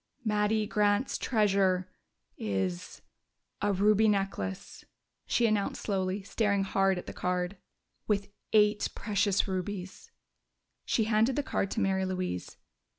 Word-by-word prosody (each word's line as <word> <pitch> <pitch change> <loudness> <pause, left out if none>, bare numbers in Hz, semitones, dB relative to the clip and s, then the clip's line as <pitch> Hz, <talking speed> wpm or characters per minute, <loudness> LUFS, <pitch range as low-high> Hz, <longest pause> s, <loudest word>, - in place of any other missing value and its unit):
"Mattie 210 0 +1
Grant's 210 +3 +1
treasure 195 -5 +1 0.4
is 95 -4 -3 0.6
a 205 - +2
ruby 210 +3 +4
necklace," 195 - -2 0.4
she 240 - +2
announced 215 -3 0
slowly, 190 -1 -1
staring 200 -1 +1
hard 195 -1 +2
at 180 - -6
the - - -7
card. 180 +1 -1 0.5
"With 200 -1 0 0.2
eight 210 -1 +3
precious 205 -2 +1
rubies!" 190 - -5 0.8
She 225 - +1
handed 220 +3 +2
the 290 - 0
card 195 - -1
to - - -2
Mary 190 -1 +1
Louise. 185 - -4
200 Hz, 120 wpm, -30 LUFS, 185-210 Hz, 0.8 s, ruby